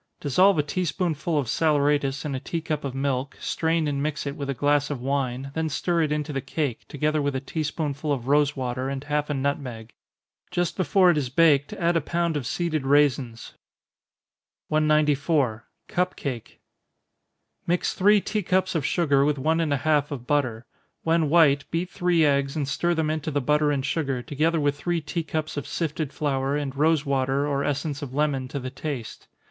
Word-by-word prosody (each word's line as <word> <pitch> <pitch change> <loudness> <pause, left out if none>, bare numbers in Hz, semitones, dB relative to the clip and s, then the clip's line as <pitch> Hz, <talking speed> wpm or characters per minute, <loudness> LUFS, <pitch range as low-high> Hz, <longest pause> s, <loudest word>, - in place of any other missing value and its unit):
Dissolve 185 +7 +4
a 150 - +3
tea 180 +5 -2
spoonful 165 -3 -1
of 145 - +1
saleratus 145 -1 +1
in 145 - -2
a 130 - -2
tea 165 +5 -3
cup 155 -2 -3
of 135 -2 -4
milk, 135 0 -2
strain 160 -1 0
and 140 -1 -1
mix 150 0 -2
it 140 0 -3
with 140 -1 -5
a 140 - -1
glass 145 +2 +2
of 145 -4 -3
wine, 135 0 -2
then 160 0 -1
stir 170 +3 0
it 155 -2 0
into 150 0 -2
the 135 - -2
cake, 135 -2 -3
together 150 +1 0
with 140 -1 -1
a - - 0
tea 150 +4 -4
spoonful 150 -1 -2
of 130 -3 -2
rosewater, 135 -3 +1
and 135 0 -4
half 150 0 -1
a 145 - -1
nutmeg. 130 -5 -3 0.6
Just 175 -1 -1
before 185 -1 +4
it 155 - +1
is 130 -4 -3
baked, 145 +2 +3
add 175 -4 0
a 165 - +3
pound 170 +1 -1
of 135 -6 -2
seeded 165 -4 -1
raisins. 135 -4 +1 1.2
194. 150 -5 +2 0.2
Cup 180 +1 -1
Cake. 125 -5 -6 1.1
Mix 175 +1 +1
three 205 +2 +5
tea 210 +2 -2
cups 185 0 +1
of 160 -4 -1
sugar 145 -4 +2
with 145 0 +1
one 160 +5 +1
and 160 -3 0
a 145 - +2
half 150 0 +1
of 130 -5 -6
butter. 125 -5 0 0.4
When 165 -2 +2
white, 145 -4 +4
beat 175 +2 -2
three 175 -3 +2
eggs, 140 -1 +1
and 145 -3 -1
stir 170 +5 0
them 160 -1 0
into 155 0 -2
the 145 -1 0
butter 150 +2 +2
and 140 -2 -1
sugar, 135 -4 -1
together 155 +5 0
with 145 -1 +1
three 175 +3 0
tea 165 +3 -3
cups 155 -1 -4
of 145 - -4
sifted 155 -3 -2
flour, 140 -2 -1
and 140 -2 -4
rosewater 140 -3 +1
or 140 -1 0
essence 145 0 -2
of 135 -2 -6
lemon 140 -3 0
to 140 +2 -4
the 130 0 -6
taste. 135 -4 -6
145 Hz, 195 wpm, -25 LUFS, 140-160 Hz, 1.2 s, three